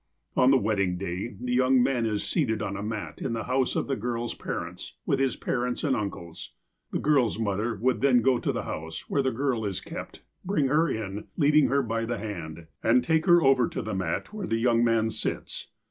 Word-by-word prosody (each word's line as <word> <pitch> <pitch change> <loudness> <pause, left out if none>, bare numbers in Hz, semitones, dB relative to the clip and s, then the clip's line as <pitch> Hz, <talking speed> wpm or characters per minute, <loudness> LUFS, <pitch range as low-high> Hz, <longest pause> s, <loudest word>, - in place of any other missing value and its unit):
On 125 - +5
the 135 - +6
wedding 100 -5 0
day, 95 +5 -4
the 125 0 -2
young 130 0 +4
man 125 -3 +1
is 105 -2 -1
seated 115 -10 0
on 100 -1 -3
a 100 - -4
mat 105 0 -5
in - - -2
the 115 -1 -2
house 130 +3 0
of - - 0
the 135 - -1
girl's 120 +1 -3
parents, - - -6
with 135 - +1
his 135 -3 +1
parents 125 0 -2
and 140 -4 +2
uncles. 90 -6 -6 0.4
The - - 0
girl's 135 -8 +2
mother 110 +1 -1
would 125 +5 0
then 125 -4 +4
go 130 -2 +3
to - - 0
the - - -3
house, 80 +1 -5
where 140 - +1
the 130 - +1
girl 125 -2 -1
is 100 -3 -2
kept, - - -8 0.2
bring 160 -8 +1
her 155 +3 +3
in, 105 -3 -4
leading 150 -1 +5
her 140 0 +2
by 115 -1 -1
the 120 +1 -2
hand, 85 -6 -6 0.2
and 120 +2 +4
take 160 +1 +1
her 175 -1 +6
over 135 -3 +4
to - - -4
the - - -4
mat 95 - -2
where 205 -4 -4
the 115 - +1
young 115 0 +3
man 115 -1 +2
sits. 110 - -4
120 Hz, 220 wpm, -27 LUFS, 105-135 Hz, 0.4 s, the